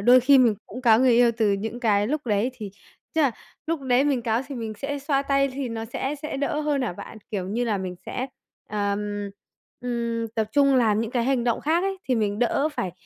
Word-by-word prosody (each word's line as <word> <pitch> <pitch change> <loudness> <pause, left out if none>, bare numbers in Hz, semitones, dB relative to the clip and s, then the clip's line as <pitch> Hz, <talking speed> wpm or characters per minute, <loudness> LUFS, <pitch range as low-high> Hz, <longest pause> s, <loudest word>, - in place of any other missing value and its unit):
đôi 245 +5 +7
khi 270 +2 +6
mình 240 -4 +5
cũng 250 +5 -8
cáu 225 -3 +6
người 255 -2 +5
yêu 240 0 +5
từ 215 -3 +2
những 220 +4 -3
cái 205 -3 +2
lúc 295 +1 -2
đấy. 215 +3 +1
Thì 215 -5 -7 0.4
tức 320 - +3
là 275 - +4 0.4
lúc 325 -2 -1
đấy 260 0 +2
mình 275 -4 +1
cáu 225 0 +1
thì 280 - -7
mình 225 -3 -4
sẽ 285 +4 -3
xoa 275 0 0
tay 275 0 +2
thì 265 -1 -4
nó 225 -1 -4
sẽ 265 +5 -3
sẽ 305 - -4
đỡ 285 +2 -1
hơn 295 -3 0
hả 240 - -1
bạn? 215 +5 -10
Kiểu 190 -3 -3
như 235 +5 -1
là, 215 -4 0
mình 185 -1 -4
sẽ, 255 - -3 0.4
ờm, 205 0 -2 0.5
ừm, 235 -2 -2
tập 220 -2 0
trung 275 0 +4
làm 220 -4 +3
những 225 -1 -3
cái 240 -2 0
hành 260 -2 +1
động 235 -2 +1
khác 325 +4 +1
ấy, 390 0 -2
thì 255 - +3
mình 210 -3 0
đỡ 275 +5 +2
phải, 185 -10 -3
240 Hz, 240 wpm, -25 LUFS, 215-275 Hz, 0.5 s, đôi